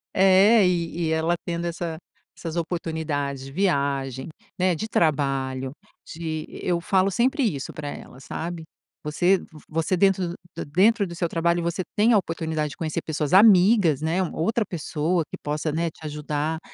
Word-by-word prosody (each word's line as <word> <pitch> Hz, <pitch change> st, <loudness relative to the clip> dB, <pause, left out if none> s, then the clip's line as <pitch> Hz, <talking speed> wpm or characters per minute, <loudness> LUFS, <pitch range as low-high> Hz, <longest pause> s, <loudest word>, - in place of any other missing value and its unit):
É, 195 Hz, +3 st, +6 dB
e 170 Hz, -1 st, -1 dB
e -, -, 0 dB
ela 160 Hz, +2 st, +1 dB
tendo 170 Hz, -1 st, -3 dB
essa 170 Hz, -1 st, -4 dB, 0.4 s
essas 165 Hz, -1 st, -6 dB
oportunidades 160 Hz, -5 st, -2 dB
de 135 Hz, -, -9 dB
viagem, 140 Hz, -6 st, -1 dB, 0.3 s
né, 180 Hz, -1 st, +2 dB
de 215 Hz, +8 st, -4 dB
trabalho, 135 Hz, -5 st, 0 dB, 0.3 s
de 160 Hz, -1 st, -5 dB
e -, -, -10 dB
eu 175 Hz, -1 st, +1 dB
falo 190 Hz, +2 st, +2 dB
sempre 260 Hz, -, +1 dB
isso 145 Hz, -, -2 dB
pra 150 Hz, -1 st, -6 dB
ela, 130 Hz, -, -10 dB
sabe. 165 Hz, +4 st, -5 dB, 0.4 s
Você 175 Hz, +5 st, +2 dB
v -, -, -11 dB, 0.2 s
você 165 Hz, +3 st, 0 dB
dentro 195 Hz, 0 st, +3 dB
do 170 Hz, -, -6 dB, 0.2 s
da -, -, -4 dB
dentro 200 Hz, +7 st, +3 dB
do 170 Hz, -, -8 dB
seu 170 Hz, 0 st, -1 dB
trabalho, 170 Hz, +1 st, +1 dB
você 170 Hz, +2 st, -1 dB
tem 220 Hz, +3 st, +4 dB
a 215 Hz, -, +6 dB
oportunidade 160 Hz, -4 st, -2 dB
de -, -, -11 dB
conhecer 160 Hz, 0 st, -2 dB
pessoas 155 Hz, -1 st, -2 dB
amigas, 190 Hz, -, +6 dB
né, 165 Hz, +4 st, 0 dB
uma 180 Hz, -, -3 dB
outra 220 Hz, +6 st, +1 dB
pessoa 165 Hz, 0 st, -1 dB
que -, -, -6 dB
possa, 150 Hz, +1 st, -2 dB
né, 165 Hz, +2 st, 0 dB
te -, -, -22 dB
ajudar, 150 Hz, +1 st, -2 dB
165 Hz, 175 wpm, -24 LUFS, 150-185 Hz, 0.4 s, É